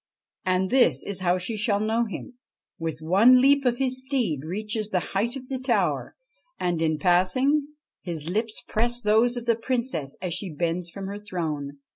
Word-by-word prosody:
And 185 0 +1
this 205 - +4
is 200 -2 -3
how 180 -1 +2
she 185 +5 -4
shall 210 -1 +1
know 220 +2 +1
him: 215 +5 -7 0.5
with 160 -1 -4
one 215 +10 +6
leap 275 +1 +4
of 245 -1 +2
his 260 -1 0
steed 255 - 0
he 155 - -8
reaches 210 +2 -3
the 185 - +1
height 225 +6 0
of 260 -1 -7
the 260 -1 -3
tower, 255 -2 0 0.4
and, 175 -2 -1
in 160 -1 +1
passing, 190 - +2 0.3
his 165 -4 -5
lips 215 +5 -1
press 240 +2 0
those 230 +2 +3
of 240 - -5
the 230 -1 +3
Princess 230 - -2
as 180 -2 -3
she 185 +2 -2
bends 170 +2 -1
from 195 +3 -7
her 200 +1 -5
throne. 155 -8 -4
205 Hz, 185 wpm, -25 LUFS, 175-240 Hz, 0.5 s, one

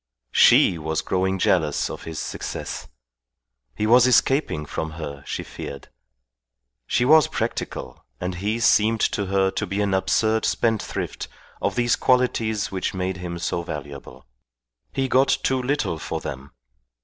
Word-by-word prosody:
She 85 - +5
was 80 0 -2
growing 95 0 0
jealous - - +1
of - - -8
his 80 -1 -6
success. - - -5 0.9
He 105 - -1
was 120 +3 +6
escaping 125 - +2
from 80 +1 -4
her, 70 -3 -7
she - - -3
feared. 70 - -8 1.0
She 120 - +1
was 155 +1 +6
practical, - - -4 0.2
and 90 0 -3
he 105 +6 -2
seemed 110 -1 +3
to 100 -2 0
her 95 0 +2
to - - -3
be 100 - -3
an 100 -2 +1
absurd 110 +3 +2
spendthrift 110 -2 -1 0.3
of - - -1
these 120 -1 +2
qualities 115 -4 +1
which 95 0 -2
made 95 0 -2
him 90 -1 -5
so 85 0 -2
valuable. 75 -4 -8 0.7
He 135 -1 -1
got 130 +1 +4 0.2
too 130 -1 +1
little 125 - -1
for - - -4
them. 65 +2 -7
100 Hz, 145 wpm, -23 LUFS, 85-120 Hz, 1.0 s, was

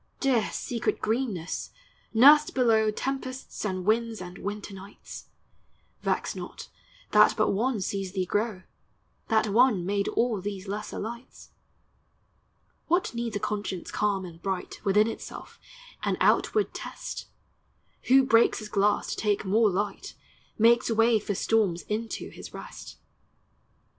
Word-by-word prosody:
Dear, 255 -5 +2
secret 235 -2 -2
greenness! 215 -7 -2 0.4
nursl 290 +6 +6
below 225 -4 +4
Tempests 260 +3 -4
and 185 -3 -2
winds 225 +1 +1
and 180 0 -8
winter 205 0 -5
nights! 195 +1 -11 0.7
Vex - - -1
not, - - -8 0.4
that - - +6
but - - +2
One 230 +3 0
sees 195 0 -3
thee 190 -2 -1
grow; 205 0 -1 0.6
That 220 -1 +2
One 220 -4 +4
made 200 +1 0
all 230 -5 0
these 200 0 -5
lesser 205 +2 -5
lights. 235 +4 -8 1.4
What 350 -3 +1
needs 235 -2 -3
a - - 0
conscience 205 -3 -4
calm 200 -2 0
and 165 -1 -11
bright 190 -2 -4
Within 210 +2 +4
itself, 225 - -8 0.4
an - - 0
outward 425 -1 +2
test? - - -7 0.8
Who 265 +1 +6
breaks 235 -3 +4
his 215 -2 -7
glass, 205 0 +1
to - - -2
take 210 -1 0
more 215 +3 +4
light, 200 +1 -3 0.4
Makes 230 +2 +4
way 225 0 +4
for 205 -1 -3
storms 195 -5 +1
into 220 +2 -4
his - - -10
rest. - - -10
215 Hz, 135 wpm, -27 LUFS, 195-235 Hz, 1.4 s, nursl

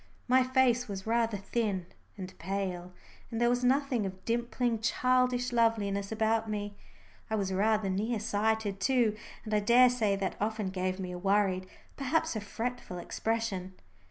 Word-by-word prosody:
My 255 +1 +5
face 255 -2 +2
was 195 -2 -6
rather 225 -1 +1
thin 200 -2 -2 0.3
and 185 -1 -7
pale, 180 -1 -3 0.4
and 225 - -3
there 240 0 +3
was 245 0 0
nothing 260 -2 +2
of 190 0 -10
dimpling 235 0 0
childish 250 +2 +1
loveliness 205 -4 +1
about 220 0 +1
me. 205 -1 -3 0.5
I 220 - 0
was 195 -3 -1
rather 210 +1 +2
near 210 +4 -1
sighted 215 -1 0
too, 235 -1 +2 0.3
and 215 - -4
I 210 - +4
daresay 235 -1 +4
that 195 -1 -3
often 215 -2 -1
gave 185 0 -2
me 185 -1 -4
a 180 - -6
worried, 195 -1 +1 0.3
perhaps 320 +2 0
a 215 - -2
fretful 230 -2 -4
expression. 195 -1 -2
220 Hz, 155 wpm, -30 LUFS, 195-240 Hz, 0.5 s, My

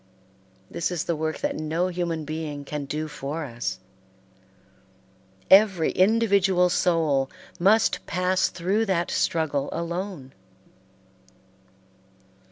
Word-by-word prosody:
This 170 - -1
is 175 -3 -2
the 170 - -1
work 155 +1 -3
that - - -1
no 160 +4 -1
human 170 -3 -3
being 155 -2 -5
can 145 0 -4
do 155 +2 -3
for 150 +2 -5
us. 115 -7 -4 1.7
Every 190 -4 +5
individual 195 -3 +3
soul 155 -7 +1 0.3
must 210 +5 +3
pass 185 +2 +1
through 195 +6 -1
that 175 -3 0
struggle 145 -4 0
alone. 170 -4 -5
170 Hz, 100 wpm, -25 LUFS, 150-185 Hz, 1.7 s, Every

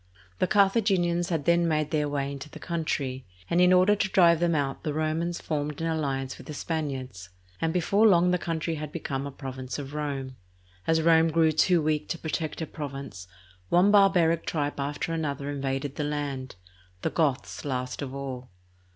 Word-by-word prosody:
The 185 - +2
Car 200 +1 +5
thaginians 180 -5 +1
had 160 -5 -1
then 170 0 +3
made 155 -2 0
their 150 -2 +1
way 140 -1 -2
into 140 +2 -7
the - - -11
country, 145 -6 -3 0.3
and 175 - +4
in 180 0 +6
order 185 +3 +5
to 200 -1 0
drive 170 -4 +5
them 170 -1 +2
out 140 -2 -1
the 150 -2 -3
Romans 160 +2 -1
formed 150 -1 -3
an 165 - -2
alliance 135 -5 -2
with - - -12
the 150 - -6
Spaniards, 130 - -4 0.3
and 165 - +1
before 195 +6 +3
long 180 -2 +5
the 180 - +1
country 165 -1 -2
had 150 -1 -5
become 140 -4 -3
a - - -6
province 130 -2 -6
of 140 -1 -7
Rome. 140 -4 -4 0.5
As 160 0 +3
Rome 165 0 +5
grew 160 0 +3
too 165 +2 +3
weak 150 0 0
to 170 - -2
protect 160 0 -3
her - - -1
province, 140 - -7 0.4
one 180 +4 +5
barbaric 180 -5 +4
tribe 145 -2 -2
after 145 +4 -2
another 145 -3 -2
invaded 135 0 -3
the 150 - -1
land, 145 -4 -3 0.5
the - - 0
Goths 145 -5 -1
last 125 -2 -3
of 135 -1 -5
all. 130 -2 -6
155 Hz, 185 wpm, -27 LUFS, 140-170 Hz, 0.5 s, in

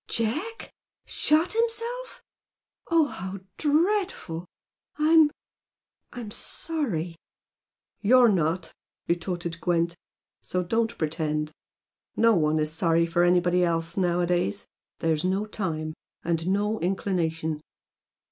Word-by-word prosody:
Jack?... 305 - -3 0.3
Shot 315 +6 +2
himself?... 465 +2 -2 0.7
Oh, 330 -2 +5
how 190 -7 -6 0.2
dreadful! 315 - 0 0.5
I'm 310 0 +6 0.8
I'm 235 -4 -7
sorry 210 - -2 0.4
!" - - -56
"You're 245 +3 +6
not!" 170 -2 0 0.3
retorted 170 -1 -2
Gwent 170 -1 +1 0.5
"So 180 0 -2
don't 225 +5 0
pretend. 155 -1 -1 0.6
No 230 0 +5
one 155 -2 +2
is 155 0 0
sorry 165 0 +2
for 170 +1 +2
anybody 175 0 +3
else 165 -1 0
nowadays. 175 - +1 0.4
There's 160 -1 +1
no 190 +3 +1
time. 160 -7 -3 0.3
And 165 0 -1
no 205 +3 +1
inclination. 165 -4 -1
180 Hz, 100 wpm, -26 LUFS, 165-240 Hz, 0.8 s, I'm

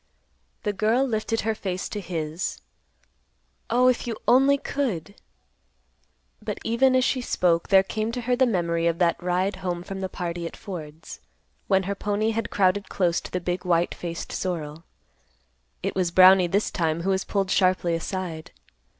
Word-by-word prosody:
The 210 - -1
girl 220 +7 +2
lifted 225 -2 -1
her 220 +1 0
face 190 -3 -4
to 210 - -4
his; 165 -2 -4 1.1
"Oh, 250 +2 +4
if 250 -1 +1
you 230 - -3
only 270 +3 +5
could!" 230 - -3 1.3
But, - - -4
even 255 +3 +3
as 255 - +4
she 260 - 0
spoke, 170 -8 +1
there 190 -1 +6
came 215 +3 -3
to 245 - -3
her 245 +1 +1
the 260 +1 +3
memory 170 -5 0
of 165 0 +1
that 170 -1 +1
ride 180 +3 0
home 175 -2 -3
from 195 +1 -6
the 190 - -3
party 175 -2 -4
at - - -10
Ford's, 160 -6 -8 0.5
when 190 -1 +3
her 200 +2 -2
pony 205 +2 -1
had 225 0 -2
crowded 195 0 +1
close 175 -3 +1
to - - -9
the 180 - -1
big 180 +1 -3
white 175 -1 +1
faced 170 -1 -6
sorrel. 165 -3 -4 1.0
It - - -1
was 185 -2 0
Brownie 185 +1 +7
this 200 +5 0
time 165 -2 -1
who 195 - +1
was 190 0 0
pulled 195 -2 -1
sharply 185 -2 +2
aside. 165 -1 -4
190 Hz, 170 wpm, -25 LUFS, 175-215 Hz, 1.3 s, Brownie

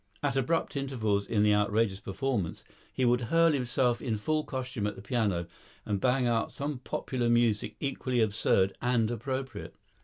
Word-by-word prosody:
At 140 -2 +1
abrupt 135 +6 0
intervals 110 -8 -1
in 105 -2 +2
the 105 0 +5
outrageous 105 -1 +1
performance 100 -4 -2 0.3
he 130 - 0
would 120 0 +3
hurl 165 0 +5
himself 125 -3 +1
in 115 -1 -1
full 155 +8 0
costume 130 -7 -3
at 105 - -4
the - - -10
piano 100 -7 0 0.4
and 100 -2 -1
bang 125 0 +2
out 115 -2 +1
some 140 -2 -4
popular 125 -1 -2
music 115 -3 +2
equally 130 -2 -1
absurd 100 -3 +2
and 120 -2 +2
appropriate. 130 -1 -4
120 Hz, 160 wpm, -29 LUFS, 105-130 Hz, 0.4 s, the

